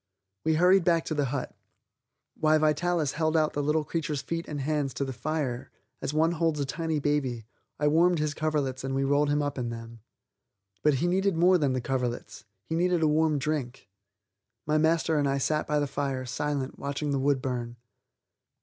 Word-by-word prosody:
We 160 0 +2
hurried 180 +3 +5
back 165 -1 +2
to - - -2
the 145 -2 +1
hut. 130 0 -4 0.8
While 155 0 +3
Vitalis 155 0 +1
held 160 0 +1
out 155 -1 +2
the 145 - -1
little 150 +2 +1
creature's 150 -3 -3
feet 165 +4 -4
and 150 -2 -4
hands 140 -1 -1
to 140 - -1
the 135 - -4
fire, 135 -1 -3 0.3
as - - -2
one 160 +2 +2
holds 165 -2 0
a 140 - 0
tiny 160 +3 -2
baby, 140 -6 -1 0.3
I 150 - +2
warmed 170 +4 +4
his 150 -1 -1
coverlets 145 -5 -1
and 135 0 -2
we 135 - +1
rolled 145 +1 +2
him 145 0 +1
up 145 -2 -3
in 120 -1 -2
them. 115 0 -8 0.8
But 150 -2 +3
he 165 +7 0
needed 190 +1 +1
more 180 +2 +5
than 140 -4 +1
the 130 - -1
coverlets; 125 -3 -3 0.2
he - - -5
needed 175 0 +2
a - - +4
warm 155 0 +2
drink. 135 -5 -3 0.8
My 155 +1 +2
master 160 0 +2
and 140 -1 +1
I 135 - +1
sat 150 +3 0
by 150 - +1
the 145 - +1
fire, 135 -2 -3
silent, 140 +2 -3
watching 145 +1 -3
the 140 - +1
wood 140 0 +2
burn. 120 -2 -4
150 Hz, 195 wpm, -28 LUFS, 135-160 Hz, 0.8 s, hurried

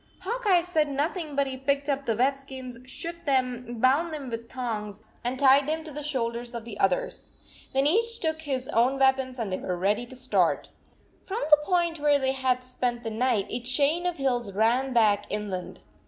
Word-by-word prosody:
Hawk 465 +5 -3
Eye 360 -3 +5
said 320 -4 +1
nothing, 300 +2 -2
but 280 0 +2
he 265 -1 -4
picked 280 +1 0
up 280 -1 -1
the 225 - +2
wet 265 +3 +3
skins, 260 -3 -8
shook 335 +5 -2
them, 250 -4 -1
bound 280 +7 +3
them 280 -5 -6
with 230 0 -6
thongs, 215 -5 -5 0.2
and 245 +2 -2
tied 275 +1 +5
them 315 +1 -1
to 310 - -9
the 295 +1 -6
shoulders 240 -4 -2
of 230 -1 -6
the 220 -4 -8
others. 190 -2 0 0.4
Then 270 +1 +2
each 460 +9 +2
took 315 -1 -1
his 265 -4 -3
own 250 +4 +2
weapons 265 -1 +2
and 225 -5 -3
they - - -2
were 180 -1 -3
ready 205 +6 0
to 260 - -10
start. 255 - +1 0.5
ii - - -34
From 425 +5 -2
the 300 - +10
point 345 -2 +1
where 290 -1 +4
they 265 -1 +1
had 260 -1 0
spent 245 -1 -3
the 225 - -3
night, 225 -2 +1
a 240 - -1
chain 285 +8 +2
of 355 - -2
hills 245 -6 0
ran 235 +6 +2
back 210 -4 +3
inland. 205 -3 -4
265 Hz, 205 wpm, -27 LUFS, 235-295 Hz, 0.5 s, the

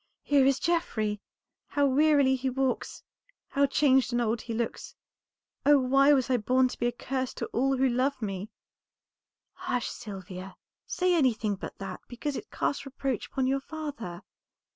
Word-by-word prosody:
"Here 280 -2 +4
is 275 -1 +3
Geoffrey! 220 - -1 0.5
How 285 -1 +1
wearily 280 -1 +4
he 260 +1 -1
walks, 265 0 -2 0.5
how 280 0 +2
changed 265 -2 +3
and 240 - +1
old 230 -1 0
he 235 - -7
looks, 230 0 -3 0.7
oh, 290 0 +6
why 275 +2 +4
was 265 -4 +3
I 255 -1 +2
born 255 +3 +2
to - - -9
be 240 - +1
a - - +1
curse 260 +1 -3
to - - -3
all 270 +2 +2
who 265 +1 +3
love 255 +3 0
me!" 200 -2 -4 1.0
"Hush, 250 -1 -2
Sylvia, 190 -2 -8 0.3
say 365 0 +1
anything 235 -9 +2
but 190 - -8
that, 195 -1 -6
because 275 +4 -4
it 420 - -7
casts 280 - -1
reproach 270 -3 -3
upon 265 - -1
your 270 +1 +1
father. 285 - -6
260 Hz, 165 wpm, -28 LUFS, 230-275 Hz, 1.0 s, oh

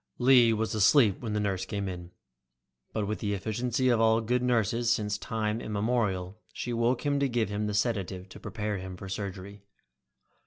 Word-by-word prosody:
Lee 125 -2 +6
was 110 0 -1
asleep 110 0 +4
when 110 -3 -3
the 105 - 0
nurse 95 -3 -1
came, 95 -4 -5 0.8
but 110 -2 -2
with 105 -2 -3
the 100 -1 -1
efficiency 120 +5 -1
of 120 -2 +3
all 110 0 +4
good 120 +2 0
nurses 120 -1 +1
since 105 -2 0
time 110 0 -2
immemorial, 105 -3 -1
she 120 - -4
woke 120 +4 0
him 145 -1 +1
to 140 -1 +1
give 115 -4 0
him 105 +1 -2
the 105 - -2
sedative 100 -4 -1
to - - -11
prepare 105 -3 -4
him 95 0 -7
for 95 - -8
surgery. 100 0 -6
110 Hz, 180 wpm, -29 LUFS, 100-120 Hz, 0.8 s, Lee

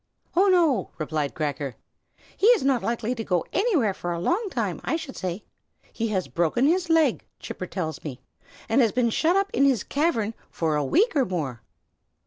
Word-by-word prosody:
"Oh, 380 +3 +5
no!" 330 - +3
replied 155 -2 -2
Cracker. 145 -4 -3 0.6
"He 410 - +2
is 480 -2 +5
not 265 -3 +2
likely 235 0 -1
to 230 -3 -4
go 180 -5 0
anywhere 345 - +2
for 175 -1 -5
a 170 - -2
long 370 - 0
time, - - -2
I - - 0
should 310 -5 -6
say. 185 +2 -4 0.5
He 230 - -1
has 190 -4 -1
broken 170 - +1
his 345 +3 +2
leg, 320 -6 +3 0.2
Chipper 185 - -6
tells 165 -4 -4
me, 130 -5 -6 0.5
and 230 +4 +3
has 230 -3 +3
been 235 -2 +1
shut 330 +9 +2
up 395 0 +1
in 275 - +3
his 265 -7 +3
cavern 245 -8 0 0.2
for 160 -2 -1
a 150 - +1
week 410 - +2
and 270 -10 +1
more." 145 -10 -3
230 Hz, 190 wpm, -25 LUFS, -, 0.6 s, Oh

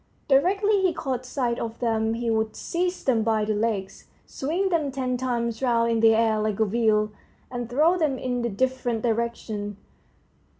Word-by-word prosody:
Directly 395 +9 +3
he 370 -3 +2
caught 255 -4 -3
sight 245 -3 -1
of 230 0 -4
them, 225 -2 0
he 235 0 -1
would 220 0 0
seize 360 +1 -2
them 240 -4 +2
by 220 -1 +1
the 215 - 0
legs, 210 -3 -2 0.2
swing 345 +8 -1
them 315 -6 0
ten 255 -1 -2
times 235 -2 -2
round 235 -2 +2
in 230 - +1
the 225 0 +6
air 220 -1 +2
like 215 -1 -1
a 220 - +4
wheel, 215 0 +2 0.4
and 245 -2 -4
throw 315 +8 +3
them 295 -5 +1
in 250 -1 -2
different 250 -2 -1
directions. 220 -3 -2
235 Hz, 170 wpm, -25 LUFS, 220-270 Hz, 0.4 s, the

